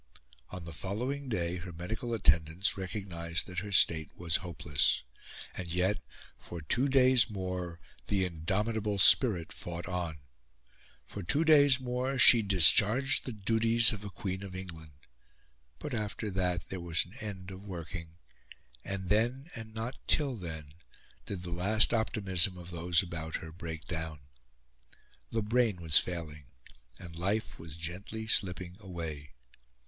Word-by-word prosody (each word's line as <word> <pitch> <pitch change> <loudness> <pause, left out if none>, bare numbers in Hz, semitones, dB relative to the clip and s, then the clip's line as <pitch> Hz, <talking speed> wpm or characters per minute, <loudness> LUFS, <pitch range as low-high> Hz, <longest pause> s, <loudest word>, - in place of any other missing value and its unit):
On 90 -1 -8
the 85 - -8
following 125 - -4
day 90 -5 -1
her 90 +1 -8
medical 100 +8 -5
attendants 80 +1 +2
recognised 90 -3 -3
that 90 -1 -4
her 105 +2 -7
state 80 -5 +3
was 85 -1 +1
hopeless; 75 -5 0 0.5
and 90 - -6
yet, 90 +4 +1 0.4
for 85 - -7
two 120 - 0
days 130 -5 +5
more, 90 -4 -5 0.3
the 95 -2 +1
indomitable 100 +5 -2
spirit 90 -2 +5
fought 85 -1 -6
on; 85 -3 -3 0.9
for 100 - -7
two 145 - +1
days 145 -4 +6
more 130 +1 -2
she 120 -2 +8
discharged 100 - +5
the 125 - -4
duties 115 +2 +3
of 105 -1 -7
a 100 - -6
Queen 95 -1 -5
of 95 -2 -8
England. 80 -5 -7 0.8
But 140 - -6
after 105 -1 -3
that 90 -2 -1
there 95 -2 -5
was 85 -1 0
an 90 - -17
end 95 -4 -7
of 95 +1 -10
working; 85 -3 -8 0.7
and 95 -1 -4
then, 120 - 0
and 115 -1 -9
not 115 +4 -6
till 140 -4 +2
then, 80 -7 -8 0.5
did 95 -3 -5
the 90 - -6
last 100 +7 +2
optimism 95 -5 +2
of 90 0 -10
those 85 +1 +1
about 80 -3 -5
her 80 - -6
break 80 -2 -7
down. 80 -3 -5 1.1
The 115 -1 -2
brain 115 -1 +2
was 80 -2 +6
failing, 75 -5 -6 0.5
and 85 -1 -10
life 100 +6 -2
was 80 -1 -9
gently 95 +7 -5
slipping 90 -4 0
away. 80 -8 -7
95 Hz, 145 wpm, -31 LUFS, 85-110 Hz, 1.1 s, she